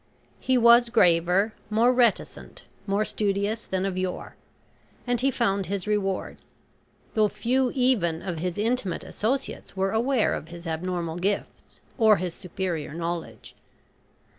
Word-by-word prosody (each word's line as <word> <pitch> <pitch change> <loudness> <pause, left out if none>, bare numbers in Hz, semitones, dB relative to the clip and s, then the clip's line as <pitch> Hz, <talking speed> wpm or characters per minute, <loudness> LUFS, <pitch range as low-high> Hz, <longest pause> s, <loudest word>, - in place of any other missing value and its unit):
He 260 -1 +1
was 235 0 +6
graver, 180 -1 +3 0.2
more 230 +4 +3
reticent, 240 -4 0 0.2
more 200 +2 +1
studious 205 +2 -1
than 190 0 -1
of 185 -1 -2
yore, 185 -1 -4 0.7
and 245 -1 0
he 270 - +3
found 200 -7 0
his 195 0 -3
reward, 205 -3 -1 0.8
though 215 -1 +3
few 245 +5 0
even 220 -11 +1
of 175 -4 -4
his 180 +1 -3
intimate 215 -4 -1
associates 250 -2 -3
were 195 0 +1
aware 235 +2 +1
of 155 - -5
his 170 +1 -11
abnormal 170 0 -3
gifts, 195 +3 -3 0.2
or 220 -2 +6
his 180 -1 -3
superior 170 -4 -4
knowledge. 170 0 -5
200 Hz, 135 wpm, -25 LUFS, 180-230 Hz, 0.8 s, was